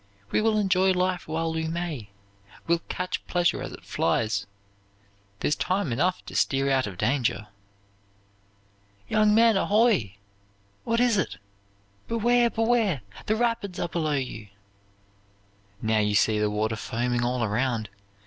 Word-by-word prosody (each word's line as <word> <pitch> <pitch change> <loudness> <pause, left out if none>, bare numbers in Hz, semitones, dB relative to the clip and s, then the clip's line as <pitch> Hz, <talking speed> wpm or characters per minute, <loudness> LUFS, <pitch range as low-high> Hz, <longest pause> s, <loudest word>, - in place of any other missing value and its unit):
We - - +2
will 220 0 +2
enjoy 190 -2 +3
life 180 -1 -1
while 160 +1 -1
we 160 0 -2
may, 160 -10 -4 0.6
will 170 0 +1
catch 180 0 -3
pleasure 175 -1 +1
as - - -5
it - - -11
flies. 100 +3 0 0.9
There's 150 - +1
time 185 -7 -1
enough 180 +9 0
to - - -9
steer 135 0 +2
out 130 -3 +2
of 95 -3 -8
danger.' 125 -2 0 1.6
"'Young 215 -1 +3
men, 230 -1 +5
ahoy!' 205 - +2 0.7
'What 230 0 +1
is 240 -4 +3
it?' - - -2 0.7
'Beware! 235 +1 +3
Beware! 225 - +1 0.3
The 215 - +2
rapids 225 -5 -1
are - - -2
below 155 -3 -1
you!' 125 -6 -4 1.4
"Now 110 0 +2
you 105 -1 +1
see 105 +2 +3
the 105 0 +1
water 110 +2 -1
foaming 120 +2 -1
all 125 0 0
around. 115 0 -1
165 Hz, 140 wpm, -26 LUFS, -, 1.6 s, men